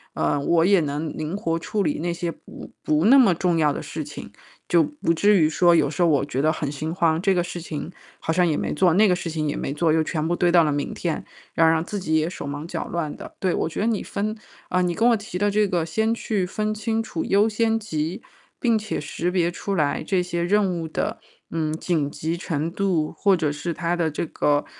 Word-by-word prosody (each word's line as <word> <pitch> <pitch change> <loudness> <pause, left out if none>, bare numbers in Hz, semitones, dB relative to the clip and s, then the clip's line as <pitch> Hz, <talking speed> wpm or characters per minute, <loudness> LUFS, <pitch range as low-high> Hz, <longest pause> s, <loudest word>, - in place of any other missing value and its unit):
嗯， 145 -1 0
我 170 0 +3
也 195 -3 +5
能 150 +1 -3
灵 155 +5 -3
活 165 -3 -1
处 205 +4 -2
理 150 -2 -1
那 170 +1 -1
些 170 0 -3
不 - - -12
不 155 +4 +2
那 270 +5 +7
么 220 -9 +6
重 175 0 +1
要 150 -2 +3
的 - - -4
事 - - -5
情。 - - -9 0.4
就 170 -2 +5
不 230 - -1
至 205 +4 +4
于 155 - +4
说 175 +1 +4
有 155 -4 +3
时 160 +4 -3
候 170 - +5
我 140 -2 +2
觉 135 -2 -2
得 155 +1 +3
很 150 -3 -3
心 155 +3 -4
慌， 165 -2 +2
这 195 -1 +3
个 175 - +2
事 175 0 -5
情 155 0 -5 0.3
好 160 - -1
像 180 0 +3
也 155 -3 +1
没 - - -2
做， 170 +2 +3
那 215 +1 +6
个 180 - +3
事 175 -1 -4
情 155 -1 -2
也 145 - -2
没 140 - -3
做， 155 +1 +2
又 160 0 +3
全 155 0 -2
部 175 - +1
堆 175 -1 +2
到 175 -1 +6
了 150 - +1
明 145 - -2
天， 165 -3 -3 0.3
要 165 - +4
让 160 0 +4
自 205 - -4
己 160 -4 0
也 155 +2 +1
手 - - -7
忙 145 +3 -5
脚 165 -2 -3
乱 165 -4 -3
的。 - - -10
对， 185 -2 +1
我 - - -1
觉 165 - -6
得 215 - +1
你 220 -4 0
分 215 +2 -3 0.3
呃， 180 - +1
你 175 -1 +1
跟 230 +7 +2
我 235 - +5
提 205 -4 -6
的 205 +1 +2
这 210 +1 +2
个 175 -3 0
先 220 +8 0
去 210 -5 -1
分 215 +3 -2
清 220 +1 -1
楚 215 -7 -4
优 205 +2 +3
先 225 +1 +1
级， 175 +1 -3 0.4
并 230 -3 +2
且 215 0 -3
识 165 +4 -3
别 175 -2 +2
出 195 +3 -4
来 150 -5 0
这 185 -2 +1
些 175 -1 -2
任 200 +2 +2
务 - - -4
的， - - -3 0.3
嗯， 155 -2 -1
紧 155 -3 -1
急 160 +2 -3
程 165 -3 -2
度 175 -4 0
或 195 -3 +3
者 155 -3 0
是 150 +4 -3
它 170 +1 -1
的 165 -3 0
这 155 - -3
个， 145 -2 +1
170 Hz, 270 characters per minute, -23 LUFS, 155-195 Hz, 0.4 s, 那